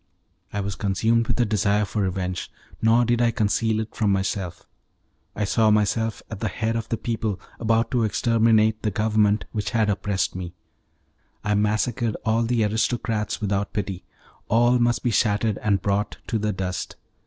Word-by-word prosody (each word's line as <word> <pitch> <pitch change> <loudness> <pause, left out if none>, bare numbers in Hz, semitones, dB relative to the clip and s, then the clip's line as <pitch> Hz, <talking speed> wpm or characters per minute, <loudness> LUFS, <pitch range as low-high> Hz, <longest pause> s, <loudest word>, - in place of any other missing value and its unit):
I 105 - -2
was 100 0 -3
consumed 110 +5 +1
with - - -1
a - - +4
desire 105 -1 +1
for 105 +1 -2
revenge, 90 -2 -2 0.3
nor 115 +2 +4
did 120 0 +1
I 120 - +4
conceal 110 0 +1
it 110 - -7
from 105 -3 +1
myself. 95 -2 -2 0.7
I 105 - -1
saw 110 +2 +3
myself 105 +1 +1
at 105 - -5
the 110 - -1
head 110 +3 -2
of 115 -1 -3
the 115 - -1
people, 110 -4 -2 0.2
about 115 0 +1
to 125 - +2
exterminate 110 0 +3
the 110 - 0
Government 105 0 +2
which 105 -2 -2
had 110 -3 +2
oppressed 100 -1 -1
me; 90 -1 -6 0.9
I 105 - +1
massacred 110 +3 0
all 110 +1 +2
the 115 -1 +1
aristocrats 110 0 -1
without 100 -1 -1
pity; 95 -3 -3 0.4
all 120 +2 +4
must 120 0 +1
be 120 - +1
shattered 105 -1 +1
and 100 -2 0
brought 100 +1 0
to 110 - -1
the 105 0 0
dust. 95 -2 -4
110 Hz, 170 wpm, -24 LUFS, 100-115 Hz, 0.9 s, a